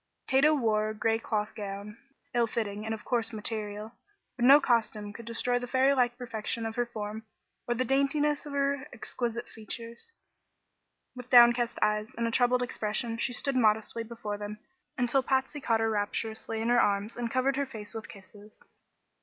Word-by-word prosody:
Tato 290 +3 +4
wore 215 -5 +1
a - - -3
gray 225 +1 +1
cloth 215 -2 -2
gown, 205 0 -6 0.4
ill 240 -1 +3
fitting 210 -2 -3
and 220 - -2
of 215 - -13
coarse 235 -2 0
material; 215 -1 -3 0.4
but 240 - 0
no 275 +3 +9
costume 220 -5 0
could 235 +1 -10
destroy 245 +1 0
the 245 - -6
fairy 260 +2 +3
like 245 -2 +1
perfection 230 -2 -3
of 225 - -3
her 245 0 0
form 215 -1 -5 0.5
or 240 - +1
the 255 +2 0
daintiness 290 +3 +1
of 290 - -7
her 280 0 0
exquisite 240 0 -4
features. 230 - -8 1.0
With 250 0 -9
downcast 240 -1 +6
eyes 210 0 +1
and 235 - 0
a 230 - 0
troubled 250 +1 +3
expression 225 -1 -2
she 245 - 0
stood 275 +2 -1
modestly 220 -1 +2
before 220 -3 -6
them 210 0 -6 0.4
until 250 +1 +2
Patsy 265 +2 -1
caught 225 -3 +1
her 225 - +2
rapturously 220 +1 -2
in 230 - 0
her 240 0 +5
arms 205 +2 0
and 240 -1 -3
covered 260 +2 +1
her 280 0 -1
face 215 -5 -8
with 220 -1 -7
kisses. 205 +2 -15
230 Hz, 180 wpm, -29 LUFS, 215-250 Hz, 1.0 s, no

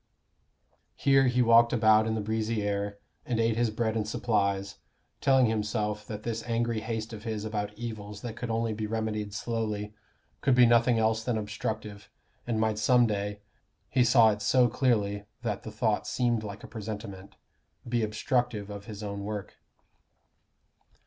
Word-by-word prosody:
Here 135 -1 +4
he 125 0 +3
walked 115 0 +6
about 110 -2 +4
in 110 - 0
the 110 - -1
breezy 110 0 -1
air, 100 0 -2 0.3
and 120 -2 -2
ate 115 0 +2
his 120 0 +1
bread 110 0 -1
and 105 -1 -1
apples, 100 -3 0 0.4
telling 135 -2 +5
himself 105 -1 -1
that 105 -1 -6
this 115 -1 -3
angry 115 -1 -1
haste 110 0 -4
of 110 -1 -8
his 110 -2 -3
about 105 -1 -3
evils 105 -3 -6
that 115 -2 -6
could 120 0 -5
only 115 0 0
be 110 0 -3
remedied 110 -1 -2
slowly, 105 -1 -3 0.5
could 135 -2 +3
be 125 -1 +7
nothing 120 0 +4
else 110 0 +1
than 120 -2 0
obstructive, 105 0 -5 0.4
and 115 -2 0
might 110 -1 +1
some 120 +2 +5
day 105 -1 -2 0.5
he 130 -2 +4
saw 120 -2 +6
it 105 0 -4
so 125 +4 +4
clearly 105 -5 0 0.2
that 105 -4 -2
the 110 - -8
thought 110 -1 0
seemed 120 -3 0
like 105 -1 -7
a - - -8
presentiment 105 -3 -7 0.5
be 120 0 0
obstructive 110 -1 -1
of 100 -1 -8
his 105 -2 -8
own 100 -1 -4
work. 105 -1 -5
110 Hz, 165 wpm, -28 LUFS, 105-115 Hz, 0.5 s, be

